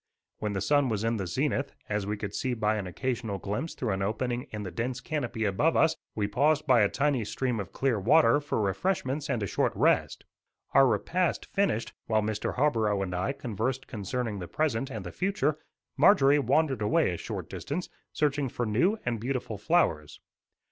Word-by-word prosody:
When 105 -1 -2
the 95 - -2
sun 145 -3 +3
was 105 -2 -1
in 115 0 +1
the 95 -3 -3
zenith, 140 - -1
as 105 -1 -2
we 105 +1 -2
could 100 -1 -5
see 130 +2 -1
by 110 -1 +1
an 100 -3 -4
occasional 115 +1 -3
glimpse 105 - -4
through 120 -4 -2
an 95 0 -1
opening 120 +4 -2
in 105 -1 -5
the 95 - -5
dense 120 +8 -3
canopy 125 -8 -3
above 125 +12 +2
us, 160 - +4 0.2
we 105 -2 0
paused 145 +8 +2
by 125 -5 +5
a 100 - +4
tiny 140 -3 +1
stream 125 +2 -2
of 100 - -5
clear 130 -5 0
water 145 +7 +5
for 145 -5 -2
refreshments 135 - -1
and 120 -6 0
a - - +1
short - - 0
rest. - - +1 0.5
Our 135 -1 +7
repast 170 - 0
finished, 195 - 0
while 110 -1 +2
Mr. 105 -1 -2
Harborough 110 -8 +2
and 90 -2 -4
I 90 +7 0
conversed 130 0 -3
concerning 110 0 -3
the 90 - -6
present 135 - -1
and 110 -7 -6
the 90 - -5
future, 185 -5 0 0.4
Marjorie 145 -7 +6
wandered 140 -4 +1
away 105 - +2
a - - -4
short - - -5
distance, 165 +6 -4 0.2
searching 145 -2 0
for 120 - -2
new 150 - +2
and 120 -2 -1
beautiful 120 -3 -3
flowers. 100 - +1
120 Hz, 190 wpm, -28 LUFS, 105-145 Hz, 0.5 s, Our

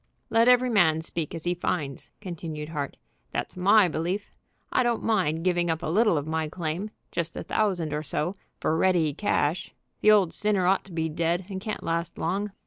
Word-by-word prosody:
"Let 230 +1 +4
every 250 0 +5
man 160 -7 +4
speak 165 -1 -4
as 165 - -6
he 175 - +1
finds," 150 -6 -3
continued 160 -5 -6
Hart. 145 -3 -4 0.4
"That's - - -3
my 200 +2 +5
belief. 175 +5 -2 0.4
I - - +3
don't 240 -2 0
mind 175 -8 +1
giving 175 -1 +1
up 165 +1 -1
a 160 - -1
little 215 -4 +4
of 145 - -2
my 160 0 -1
claim, 170 +5 -3 0.2
just 170 -1 -3
a - - -4
thousand 180 -8 0
or 150 - -1
so, 155 +5 -2 0.2
for 155 - +1
ready 165 -4 +3
cash. 170 -3 0 0.3
The 215 - +5
old 200 -5 +5
sinner 205 -3 +1
ought 190 +2 +2
to 195 - -13
be 160 -1 -1
dead, 170 +3 -1
and 190 -1 -5
can't 215 +1 -4
last 170 0 -2
long. 205 +2 -1
175 Hz, 195 wpm, -27 LUFS, 160-200 Hz, 0.4 s, every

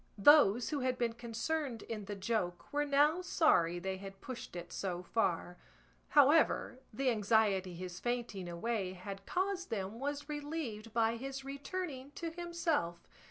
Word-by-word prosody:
Those 240 -1 +6
who 295 - -1
had 255 -1 0
been 235 -2 0
concerned 235 +2 -3
in 215 -3 -5
the 205 +1 -5
joke 195 -2 -2
were 295 0 +2
now 295 +5 +4
sorry 175 - +3
they 190 +2 -3
had 195 0 -9
pushed 250 -7 -7
it 175 0 -6
so 180 -2 -3
far; 180 -3 0 0.5
however, 290 -2 +4
the 255 +3 +1
anxiety 205 -4 +2
his 180 0 -6
fainting 235 -7 -2
away 190 +2 -2
had 195 +1 -8
caused 375 0 -1
them 205 +1 -3
was 285 +1 -3
relieved 290 -7 -4
by 230 0 +2
his 270 +2 -6
returning 280 0 -5
to 335 -1 -4
himself. 330 - -1
230 Hz, 150 wpm, -34 LUFS, 195-290 Hz, 0.5 s, Those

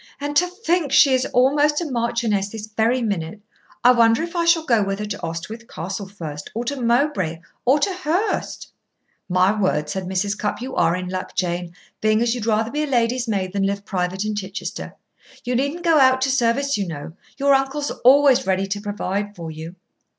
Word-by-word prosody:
"And 290 +1 -4
to 360 - +4
think 355 - -1
she 275 0 +6
is 255 0 +1
almost 290 +4 +3
a 345 - -3
marchioness 230 -6 -1
this 215 0 -7
very 225 +3 0
minute. 195 -3 -3 0.4
I 245 - +8
wonder 230 +3 +4
if 340 +1 -6
I 340 -1 +1
shall 335 -1 +3
go 230 -6 +3
with 195 0 -2
her 210 - -4
to 205 -1 -5
Oswyth 170 +8 -6
Castle 190 +4 -5
first, 155 -7 -8
or 235 +2 -2
to 275 +1 -3
Mowbray, 235 - +1 0.3
or 260 +4 +5
to 380 +6 +1
Hurst?" 365 +4 -2 0.6
"My 185 +2 +3
word!" 185 -7 0
said 190 -1 -3
Mrs. 190 +2 -1
Cupp, 210 - -3
"you 260 +2 -6
are 165 0 +2
in 180 0 -4
luck, 185 0 -5
Jane, 175 -1 -2 0.3
being 215 0 +3
as 235 -1 +1
you'd 235 -3 -4
rather 220 +1 +1
be 295 - -1
a 305 - -1
lady's 245 -1 +1
maid 190 -4 -2
than 200 - -1
live 200 0 -3
private 185 +1 -2
in 215 - -1
Chichester. 195 -2 -6 0.5
You 250 0 -1
needn't 280 +7 -1
go 330 -3 +4
out 260 -1 +5
to 265 0 +2
service, 260 +1 +1
you 195 - -1
know. 160 -1 -7 0.2
Your 280 0 +3
uncle's 275 +2 0
always 270 -1 +6
ready 190 0 +1
to 200 +1 -4
provide 205 0 -3
for 165 -3 -7
you." 160 +3 -8
225 Hz, 200 wpm, -22 LUFS, 190-270 Hz, 0.6 s, I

